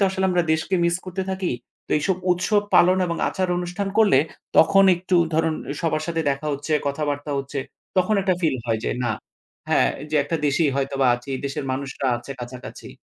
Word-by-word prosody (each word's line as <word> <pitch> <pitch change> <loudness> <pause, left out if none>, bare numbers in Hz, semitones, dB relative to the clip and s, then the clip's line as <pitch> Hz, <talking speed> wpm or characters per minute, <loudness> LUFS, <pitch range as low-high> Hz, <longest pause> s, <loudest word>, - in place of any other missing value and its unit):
তো - - +5
আসলে 190 0 -1
আমরা 180 -1 +2
দেশকে 160 +4 0
মিস 170 0 +2
করতে 185 +1 -3
থাকি। 190 -1 -1 0.3
তো - - -24
এইসব 175 +5 0 0.2
উৎসব 205 +4 +1
পালন 185 +2 +6
এবং 170 - -2
আচার 185 -1 -1
অনুষ্ঠান 180 +3 -3
করলে 205 -11 +6 0.4
তখন 195 +5 +6
একটু 180 +1 0 0.2
ধরুন 160 0 +2 0.3
সবার 155 -2 0
সাথে 165 -1 -1
দেখা 140 +2 -3
হচ্ছে 145 +3 -3
কথাবার্তা 145 0 -2
হচ্ছে 135 +1 -4 0.4
তখন 190 +4 +3
একটা 185 -1 +2
ফিল 155 -7 +1
হয় 115 -2 +1
যে - - 0
না 120 - +1 0.6
হ্যাঁ, - - +3 0.2
যে 155 - +1
একটা 165 +3 -1
দেশেই 145 +1 +2
হয়তোবা 135 -1 0
আছি 120 +3 -11
দেশের 140 0 -3
মানুষরা 135 0 -3
আছে 120 +3 -8
কাছাকাছি। 125 +1 -8
160 Hz, 185 wpm, -23 LUFS, 140-185 Hz, 0.6 s, পালন